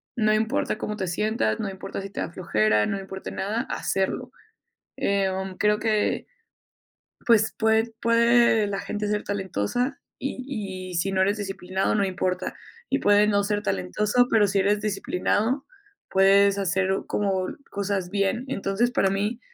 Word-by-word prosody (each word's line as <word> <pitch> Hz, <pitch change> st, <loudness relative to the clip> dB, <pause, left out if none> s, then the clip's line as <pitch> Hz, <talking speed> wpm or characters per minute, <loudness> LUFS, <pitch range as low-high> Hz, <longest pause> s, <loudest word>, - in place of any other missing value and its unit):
No 215 Hz, -2 st, +2 dB
importa 220 Hz, +3 st, 0 dB
cómo 210 Hz, -, -4 dB
te 190 Hz, -3 st, -3 dB
sientas, 180 Hz, -, 0 dB
no 210 Hz, -, -2 dB
importa 190 Hz, 0 st, -6 dB
si 195 Hz, -, -7 dB
te -, -, -5 dB
da -, -, -3 dB
flojera, 110 Hz, -, +2 dB
no 200 Hz, -, -1 dB
importa 190 Hz, 0 st, -7 dB
nada, 215 Hz, +5 st, -2 dB
hacerlo. 245 Hz, +6 st, -2 dB, 0.7 s
Em, 190 Hz, -1 st, -1 dB
creo 210 Hz, 0 st, +3 dB
que, 215 Hz, -1 st, 0 dB, 1.0 s
pues, 220 Hz, -2 st, +4 dB
pue 220 Hz, +1 st, +2 dB
puede 235 Hz, -2 st, +4 dB
la 200 Hz, -1 st, -3 dB
gente 210 Hz, 0 st, -3 dB
ser 210 Hz, 0 st, 0 dB
talentosa 200 Hz, -, -2 dB, 0.2 s
y 215 Hz, -9 st, -5 dB
y -, -, -7 dB
si 195 Hz, +3 st, 0 dB
no 190 Hz, -, +1 dB
eres 205 Hz, +3 st, +1 dB
disciplinado, 195 Hz, -1 st, -2 dB
no 200 Hz, -2 st, +2 dB
importa, 185 Hz, -1 st, -2 dB, 0.4 s
y -, -, +2 dB
puedes 205 Hz, +1 st, +4 dB
no 200 Hz, -1 st, +2 dB
ser 205 Hz, 0 st, -1 dB
talentoso, 210 Hz, -, +1 dB
pero 215 Hz, -4 st, +4 dB
si 195 Hz, -, +1 dB
eres 205 Hz, +2 st, +2 dB
disciplinado, 215 Hz, +5 st, 0 dB, 0.5 s
puedes 195 Hz, +1 st, +5 dB
hacer 190 Hz, 0 st, +1 dB, 0.2 s
como 190 Hz, -2 st, 0 dB, 0.2 s
cosas 200 Hz, -2 st, -2 dB
bien. 200 Hz, +4 st, 0 dB
Entonces, 210 Hz, 0 st, 0 dB
para 195 Hz, -7 st, +2 dB
mí 210 Hz, +5 st, -1 dB
200 Hz, 155 wpm, -25 LUFS, 190-220 Hz, 1.0 s, puedes